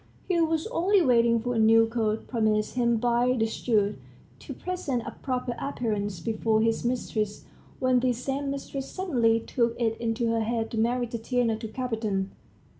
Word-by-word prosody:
He 355 Hz, -3 st, +2 dB
was 320 Hz, -1 st, +1 dB
only 390 Hz, -2 st, +3 dB
waiting 235 Hz, -3 st, +4 dB
for 245 Hz, +2 st, -2 dB
a 230 Hz, -, 0 dB
new 225 Hz, +1 st, +6 dB
coat, 225 Hz, -1 st, -1 dB
promised 215 Hz, -3 st, +1 dB
him 235 Hz, -2 st, +2 dB
by 245 Hz, +2 st, +2 dB
the 225 Hz, -, +2 dB
steward, 215 Hz, -2 st, 0 dB, 0.4 s
to -, -, -9 dB
present 285 Hz, -10 st, -3 dB
a -, -, -5 dB
proper 250 Hz, -2 st, -2 dB
appearance 210 Hz, -8 st, -2 dB
before 220 Hz, +1 st, +1 dB
his 225 Hz, 0 st, +1 dB
mistress, 220 Hz, -4 st, -2 dB, 0.3 s
when 255 Hz, -1 st, +3 dB
this 245 Hz, -1 st, +1 dB
same 275 Hz, +1 st, -2 dB
mistress 275 Hz, -1 st, -5 dB
suddenly 240 Hz, -12 st, +1 dB
took 235 Hz, 0 st, -1 dB
it 225 Hz, -2 st, +1 dB
into 230 Hz, 0 st, -1 dB
her 230 Hz, 0 st, +1 dB
head 225 Hz, 0 st, -1 dB
to 225 Hz, -, -2 dB
marry 245 Hz, +2 st, +1 dB
Tatiana 235 Hz, 0 st, -1 dB
to 225 Hz, 0 st, -6 dB
Kapiton. 220 Hz, -5 st, -2 dB
235 Hz, 170 wpm, -27 LUFS, 225-255 Hz, 0.4 s, new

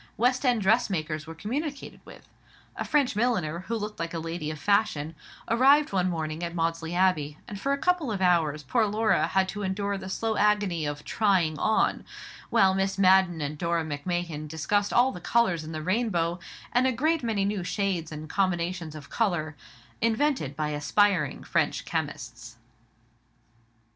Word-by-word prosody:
West 250 Hz, +3 st, +2 dB
end 245 Hz, -5 st, +2 dB
dressmakers 165 Hz, -8 st, +1 dB
were 165 Hz, -, -8 dB
communicated 275 Hz, -, -5 dB
with. -, -, -14 dB, 0.5 s
A -, -, -3 dB
French 285 Hz, -7 st, +1 dB
milliner, 185 Hz, -9 st, 0 dB
who 230 Hz, -, -1 dB
looked 210 Hz, 0 st, -5 dB
like 165 Hz, 0 st, -3 dB
a -, -, -2 dB
lady 165 Hz, -1 st, -4 dB
of 155 Hz, -, -5 dB
fashion, 165 Hz, -4 st, +1 dB, 0.3 s
arrived 275 Hz, +5 st, +4 dB
one 185 Hz, -1 st, +2 dB
morning 160 Hz, -1 st, -3 dB
at 170 Hz, 0 st, -4 dB
Maudesley 165 Hz, 0 st, -1 dB
Abbey, 155 Hz, -6 st, +1 dB
and 200 Hz, -1 st, -7 dB
for 275 Hz, -, 0 dB
a 280 Hz, -, +2 dB
couple 340 Hz, -4 st, +1 dB
of 200 Hz, -, -2 dB
hours 165 Hz, -5 st, +2 dB
poor 220 Hz, -, +1 dB
Laura 220 Hz, +2 st, +2 dB
had 190 Hz, -1 st, +1 dB
to 205 Hz, -, -5 dB
endure 200 Hz, +1 st, -2 dB
the 190 Hz, -, -7 dB
slow 220 Hz, +3 st, -1 dB
agony 205 Hz, -7 st, +2 dB
of 145 Hz, 0 st, -5 dB
"trying 185 Hz, -8 st, +1 dB
on," 220 Hz, -, +1 dB, 0.5 s
while 190 Hz, -1 st, +4 dB
Mrs. 195 Hz, 0 st, 0 dB
Madden 185 Hz, -3 st, +4 dB
and 145 Hz, +1 st, -4 dB
Dora 170 Hz, -1 st, 0 dB
Macmahon 155 Hz, +1 st, -3 dB
discussed 180 Hz, +7 st, 0 dB
all 250 Hz, +2 st, +4 dB
the 180 Hz, -, -9 dB
colours 185 Hz, -9 st, +1 dB
in 155 Hz, -, -7 dB
the 155 Hz, -1 st, -5 dB
rainbow, 180 Hz, -3 st, 0 dB, 0.3 s
and 250 Hz, +2 st, +4 dB
a -, -, +2 dB
great 310 Hz, +7 st, +1 dB
many 220 Hz, -5 st, 0 dB
new 200 Hz, -2 st, -1 dB
shades 180 Hz, -4 st, -2 dB
and 155 Hz, 0 st, -7 dB
combinations 175 Hz, -3 st, -1 dB
of 145 Hz, -2 st, -11 dB
colour, 175 Hz, -9 st, -1 dB, 0.5 s
invented 230 Hz, -, +1 dB
by 150 Hz, 0 st, -2 dB
aspiring 150 Hz, +2 st, +1 dB
French -, -, 0 dB
chemists. 120 Hz, -7 st, -5 dB
185 Hz, 170 wpm, -27 LUFS, 160-215 Hz, 0.5 s, arrived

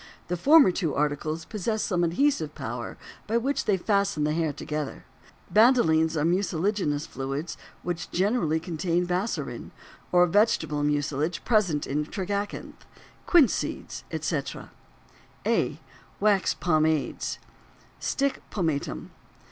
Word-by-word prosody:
The 180 Hz, -, 0 dB
former 285 Hz, -, +6 dB
two 170 Hz, -5 st, -2 dB
articles 150 Hz, +2 st, -1 dB
possess 215 Hz, +1 st, -2 dB
some 175 Hz, -3 st, 0 dB
adhesive 170 Hz, -, +1 dB
power 120 Hz, +1 st, -5 dB, 0.3 s
by 225 Hz, +2 st, +1 dB
which 270 Hz, +5 st, -1 dB
they 200 Hz, -2 st, +2 dB
fasten 200 Hz, -4 st, +1 dB
the 150 Hz, 0 st, +1 dB
hair 160 Hz, -1 st, 0 dB
together; 150 Hz, 0 st, -5 dB, 0.5 s
bandolines 165 Hz, -9 st, +4 dB
are 150 Hz, -, +1 dB
mucilaginous 175 Hz, -3 st, 0 dB
fluids 140 Hz, +4 st, -4 dB, 0.3 s
which 175 Hz, -2 st, -4 dB
generally 185 Hz, -4 st, +1 dB
contain 170 Hz, +1 st, -1 dB
bassorin 180 Hz, +5 st, -3 dB, 0.4 s
(or 180 Hz, 0 st, +6 dB
vegetable 180 Hz, -6 st, +2 dB
mucilage 145 Hz, +2 st, -1 dB
present 190 Hz, -10 st, +2 dB
in 150 Hz, +2 st, -1 dB
tragacanth), 200 Hz, +2 st, -4 dB, 0.4 s
quince 325 Hz, -8 st, +6 dB
seeds, -, -, -4 dB
etc. -, -, -3 dB, 0.7 s
A. -, -, +1 dB, 0.4 s
Wax 205 Hz, -2 st, +2 dB
Pomades. 155 Hz, -3 st, 0 dB, 0.6 s
STICK 275 Hz, -1 st, -1 dB
POMATUM. 150 Hz, -, -2 dB
175 Hz, 115 wpm, -26 LUFS, 155-205 Hz, 0.7 s, former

